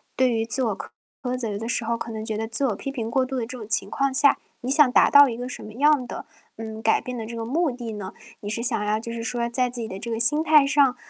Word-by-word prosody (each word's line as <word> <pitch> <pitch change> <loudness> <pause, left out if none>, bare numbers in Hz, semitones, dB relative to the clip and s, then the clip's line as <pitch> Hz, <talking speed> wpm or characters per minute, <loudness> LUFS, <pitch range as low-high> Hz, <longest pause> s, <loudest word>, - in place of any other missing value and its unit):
对 255 -1 +3
于 225 -1 0
自 255 +3 -2
我 215 -4 -1
苛 245 - -7
责 220 -5 -3
的 225 +2 -5
时 240 - -1
候 235 0 -1
可 230 - -6
能 220 -1 -5
觉 220 -2 -3
得 225 - -3
自 230 +5 -1
我 215 - -1
批 275 - -6
评 230 -4 -4
过 260 +1 +2
度 265 +1 -5
的 - - -1
这 250 +2 -8
种 215 -3 -9
情 205 -2 +1
况 275 -1 0
下， 280 +1 +4 0.2
你 255 +2 -3
想 290 -2 +6
达 - - +5
到 285 0 +8
一 230 - -4
个 245 - -5
什 - - -7
么 215 - -10
样 285 +1 +3
的， - - -7 0.3
嗯， 220 0 -7
改 220 0 +2
变 250 -1 -6
的 225 - -5
这 235 +1 -7
个 225 0 -4
目 320 +7 +1
的 240 -3 -6
呢？ 205 -2 -7 0.3
你 205 - -5
是 225 +2 -3
想 225 -3 0
要 215 +1 0
就 230 +1 -6
是 230 0 -5
说 235 0 -2
在 250 +1 0
自 240 -1 -5
己 220 - -4
的 190 - -7
这 235 - -6
个 225 - -2
心 295 +7 +4
态 300 -3 +5
上， 275 -3 +3
235 Hz, 325 characters per minute, -24 LUFS, 220-260 Hz, 0.3 s, 到